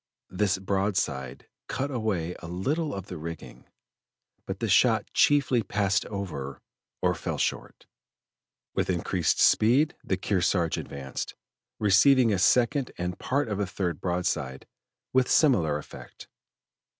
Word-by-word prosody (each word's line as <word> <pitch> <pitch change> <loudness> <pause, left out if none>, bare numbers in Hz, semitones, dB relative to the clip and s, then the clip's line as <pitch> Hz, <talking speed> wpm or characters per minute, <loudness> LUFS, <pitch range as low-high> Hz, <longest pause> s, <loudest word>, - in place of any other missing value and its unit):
This 95 0 +1
broadside 95 -9 -2 0.2
cut 140 +2 -3
away 100 -9 -2
a 85 - -9
little 140 - -1
of 95 -2 -6
the 90 -5 -8
rigging, 80 0 -8 0.8
but - - -4
the - - -1
shot - - +4
chiefly 140 -4 +3
passed 100 -1 0
over 75 -10 -5 0.4
or - - +3
fell - - -4
short. - - -3 0.9
With - - -1
increased - - 0
speed 130 +8 +4
the 95 - -1
Kearsarge 90 -3 0
advanced, 70 -1 -6 0.4
receiving 115 +4 +5
a 95 - 0
second 125 +6 +3
and 90 0 -4
part 140 0 0
of 105 -2 -3
a 100 - 0
third 90 -4 -3
broadside 85 -7 -2 0.5
with 130 -1 +3
similar 85 - +3
effect. 75 - -11
95 Hz, 125 wpm, -27 LUFS, 85-120 Hz, 0.9 s, receiving